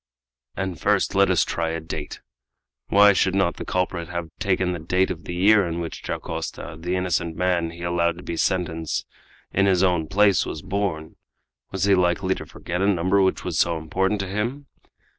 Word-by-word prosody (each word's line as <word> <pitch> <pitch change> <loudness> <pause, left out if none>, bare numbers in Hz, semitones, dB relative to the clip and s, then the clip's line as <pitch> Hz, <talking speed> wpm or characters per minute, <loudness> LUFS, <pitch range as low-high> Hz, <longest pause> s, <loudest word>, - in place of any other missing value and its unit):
"And 95 -4 -3
first - - +2
let - - +4
us - - +3
try 85 -1 -2
a 80 0 -2
date! 80 -2 -6 0.7
Why 100 0 +6
should 95 0 +1
not 95 -3 +1
the - - -6
culprit 90 -2 -2
have 85 -2 -4
taken 95 -2 +1
the 85 - -3
date 90 +4 +1
of 85 - -7
the 90 - -5
year 100 +3 +5
in 85 0 -3
which 85 -1 -5
Dacosta, - - -5
the 90 +3 -3
innocent 90 -2 -1
man 90 -2 +1
he 85 +1 -9
allowed 85 -1 0
to 90 - -10
be 85 - -4
sentenced 80 -3 -1 0.5
in 100 +1 +3
his 95 -1 +3
own 90 -4 +2
place, 100 0 +4
was - - -6
born? 90 -6 -3 0.5
Was 95 -1 -2
he 100 0 +4
likely 90 +1 +2
to - - -8
forget 90 +1 -5
a 100 - +2
number 95 +1 +2
which 95 -1 +1
was 90 -3 -2
so 85 -1 +2
important 95 +6 -1
to 95 - -4
him? 120 +9 -3
90 Hz, 195 wpm, -23 LUFS, 85-95 Hz, 0.7 s, Why